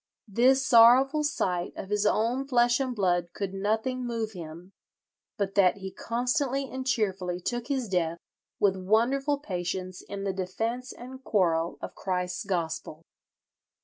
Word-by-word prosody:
This 255 Hz, +6 st, +3 dB
sorrowful 260 Hz, +6 st, +6 dB
sight 180 Hz, -12 st, -1 dB
of 195 Hz, -, -7 dB
his 210 Hz, 0 st, +2 dB
own 240 Hz, +6 st, +1 dB
flesh 240 Hz, -1 st, +3 dB
and 260 Hz, -2 st, -2 dB
blood 175 Hz, -4 st, 0 dB
could 195 Hz, -2 st, -4 dB
nothing 220 Hz, +6 st, -1 dB
move 230 Hz, -2 st, -3 dB
him, 170 Hz, 0 st, -9 dB, 0.7 s
but 195 Hz, -1 st, -1 dB
that 195 Hz, -1 st, +4 dB
he 190 Hz, -1 st, -7 dB
constantly 255 Hz, +5 st, -1 dB
and 260 Hz, +1 st, -6 dB
cheerfully 190 Hz, -7 st, 0 dB
took 240 Hz, +5 st, -3 dB
his 265 Hz, -4 st, -1 dB
death 170 Hz, -3 st, 0 dB, 0.4 s
with 195 Hz, -2 st, +3 dB
wonderful 240 Hz, +9 st, +1 dB
patience 185 Hz, -5 st, -4 dB
in 200 Hz, 0 st, -7 dB
the 195 Hz, -1 st, -1 dB
defence 225 Hz, +7 st, -3 dB
and 260 Hz, +2 st, -10 dB
quarrel 170 Hz, -7 st, +1 dB
of -, -, -5 dB
Christ's 180 Hz, -1 st, -3 dB
gospel." 165 Hz, -3 st, -3 dB
210 Hz, 145 wpm, -28 LUFS, 185-250 Hz, 0.7 s, sorrowful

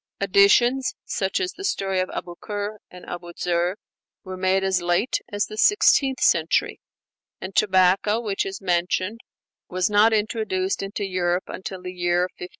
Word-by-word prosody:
Additions, 205 Hz, +7 st, +3 dB
such 190 Hz, -1 st, -1 dB
as 370 Hz, -1 st, -2 dB
the 390 Hz, -, -10 dB
'Story 195 Hz, -, -1 dB
of 185 Hz, -, -1 dB
Abu 175 Hz, -, -6 dB
Ker 210 Hz, 0 st, -5 dB
and 180 Hz, 0 st, -13 dB
Abu 175 Hz, -1 st, -8 dB
Zer,' 175 Hz, +2 st, 0 dB, 0.5 s
were 185 Hz, -1 st, -7 dB
made 190 Hz, +1 st, +1 dB
as 190 Hz, -2 st, +1 dB
late 175 Hz, +8 st, +1 dB
as 205 Hz, 0 st, 0 dB
the 215 Hz, 0 st, -8 dB
sixteenth 280 Hz, -, +4 dB
century; 160 Hz, -1 st, +2 dB, 0.6 s
and 185 Hz, +1 st, -8 dB
tobacco, 190 Hz, +2 st, +3 dB
which 210 Hz, -4 st, -2 dB
is 195 Hz, +1 st, -6 dB
mentioned, 185 Hz, +4 st, -1 dB, 0.5 s
was 185 Hz, +3 st, 0 dB
not 210 Hz, +2 st, +5 dB
introduced 210 Hz, -3 st, -1 dB
into 195 Hz, +1 st, -4 dB
Europe 180 Hz, -1 st, 0 dB
until 190 Hz, -1 st, -7 dB
the 180 Hz, 0 st, -6 dB
year 175 Hz, -1 st, +1 dB
1560. 180 Hz, 0 st, -6 dB
190 Hz, 155 wpm, -23 LUFS, 180-210 Hz, 0.6 s, not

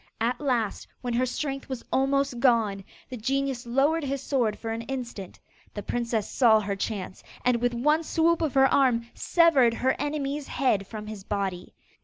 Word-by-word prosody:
At 235 Hz, +5 st, -1 dB
last, 240 Hz, -7 st, -1 dB
when 245 Hz, -2 st, -3 dB
her 255 Hz, +2 st, +1 dB
strength 275 Hz, +1 st, -4 dB
was 260 Hz, -3 st, -5 dB
almost 270 Hz, -1 st, +1 dB
gone, 225 Hz, -6 st, +2 dB, 0.3 s
the 255 Hz, -, -6 dB
genius 265 Hz, +1 st, -2 dB
lowered 285 Hz, +7 st, +2 dB
his 275 Hz, 0 st, -2 dB
sword 240 Hz, -7 st, 0 dB
for 225 Hz, -, -5 dB
an 225 Hz, +1 st, -3 dB
instant. 240 Hz, -8 st, -6 dB, 0.4 s
The 205 Hz, -, -5 dB
princess 230 Hz, -3 st, -1 dB
saw 225 Hz, -4 st, +4 dB
her 200 Hz, -1 st, -2 dB
chance, 195 Hz, -2 st, -5 dB, 0.2 s
and, 250 Hz, -1 st, +4 dB
with 240 Hz, 0 st, 0 dB
one 300 Hz, +6 st, +2 dB
swoop 330 Hz, +1 st, +2 dB
of 310 Hz, -5 st, -1 dB
her 270 Hz, 0 st, +6 dB
arm, 255 Hz, -4 st, +3 dB
severed 285 Hz, -9 st, +4 dB
her 260 Hz, +2 st, +1 dB
enemy's 290 Hz, 0 st, -2 dB
head 210 Hz, -8 st, 0 dB
from 215 Hz, -2 st, -7 dB
his 210 Hz, -2 st, -8 dB
body. 195 Hz, -3 st, -3 dB
245 Hz, 175 wpm, -26 LUFS, 220-275 Hz, 0.4 s, her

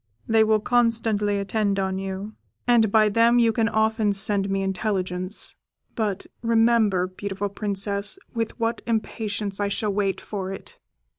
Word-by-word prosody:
They 220 Hz, 0 st, +5 dB
will 220 Hz, 0 st, +3 dB
constantly 225 Hz, -3 st, +1 dB
attend 200 Hz, 0 st, 0 dB
on 190 Hz, -1 st, -1 dB
you, 195 Hz, +2 st, -5 dB, 0.3 s
and 230 Hz, -4 st, +4 dB
by 215 Hz, 0 st, +5 dB
them 230 Hz, +3 st, +4 dB
you 230 Hz, -2 st, +4 dB
can 225 Hz, 0 st, +1 dB
often 220 Hz, -1 st, +2 dB
send 195 Hz, 0 st, +1 dB
me 195 Hz, 0 st, 0 dB
intelligence; 185 Hz, -1 st, -2 dB, 0.4 s
but 210 Hz, -4 st, -2 dB, 0.2 s
remember, 225 Hz, -5 st, +3 dB
beautiful 195 Hz, +2 st, -4 dB
Princess, 200 Hz, -, -3 dB, 0.2 s
with 230 Hz, 0 st, -3 dB
what 230 Hz, 0 st, -1 dB
impatience 215 Hz, -3 st, -2 dB
I 205 Hz, -, +1 dB
shall 205 Hz, +1 st, -1 dB
wait 195 Hz, -2 st, 0 dB
for 190 Hz, -2 st, -5 dB
it!" 195 Hz, -, -9 dB
205 Hz, 145 wpm, -24 LUFS, 195-225 Hz, 0.4 s, They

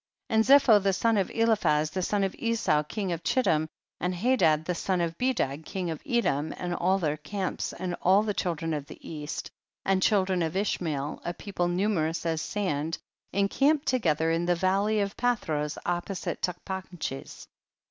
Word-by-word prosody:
25. -, -, 0 dB, 0.2 s
And 280 Hz, 0 st, +9 dB
Zepho 210 Hz, -5 st, +5 dB
the 195 Hz, -1 st, +2 dB
son 225 Hz, +4 st, +2 dB
of 195 Hz, -3 st, +1 dB
Eliphaz 205 Hz, -10 st, +2 dB
the 185 Hz, -, -2 dB
son 200 Hz, +2 st, +1 dB
of 195 Hz, -, 0 dB
Esau 230 Hz, -10 st, +1 dB
king 190 Hz, +5 st, -4 dB
of 170 Hz, -1 st, -3 dB
Chiltim, 160 Hz, -12 st, +2 dB, 0.3 s
and 180 Hz, +1 st, -1 dB
Hadad 175 Hz, -8 st, +3 dB
the 180 Hz, -, 0 dB
son 185 Hz, +1 st, -1 dB
of 165 Hz, -1 st, -1 dB
Bedad 160 Hz, -, 0 dB
king 180 Hz, 0 st, -3 dB
of 160 Hz, -, -6 dB
Edom, 160 Hz, -, +1 dB
and 175 Hz, -1 st, -3 dB
all 185 Hz, +2 st, +2 dB
their 155 Hz, -5 st, -1 dB
camps, 190 Hz, +4 st, -3 dB
and 180 Hz, -1 st, -4 dB
all 195 Hz, +3 st, +5 dB
the 210 Hz, -1 st, -1 dB
children 165 Hz, -4 st, -2 dB
of 145 Hz, -2 st, -4 dB
the -, -, -10 dB
east, 150 Hz, -2 st, -5 dB, 0.3 s
and 190 Hz, -1 st, +2 dB
children 190 Hz, -3 st, +2 dB
of 165 Hz, +1 st, -1 dB
Ishmael, 155 Hz, -8 st, -2 dB
a 175 Hz, -, -3 dB
people 185 Hz, -3 st, -2 dB
numerous 175 Hz, -3 st, 0 dB
as 160 Hz, -1 st, 0 dB
sand, 165 Hz, -6 st, -2 dB, 0.3 s
encamped 275 Hz, +10 st, +2 dB
together 165 Hz, -10 st, +2 dB
in 170 Hz, +1 st, 0 dB
the 175 Hz, -, +3 dB
val 190 Hz, +3 st, +2 dB
ley 215 Hz, 0 st, +2 dB
of 200 Hz, 0 st, -2 dB
Palhros 160 Hz, -12 st, -1 dB
opposite 175 Hz, +2 st, -3 dB
Tachpanches. 180 Hz, -5 st, -5 dB
180 Hz, 180 wpm, -28 LUFS, 160-205 Hz, 0.3 s, And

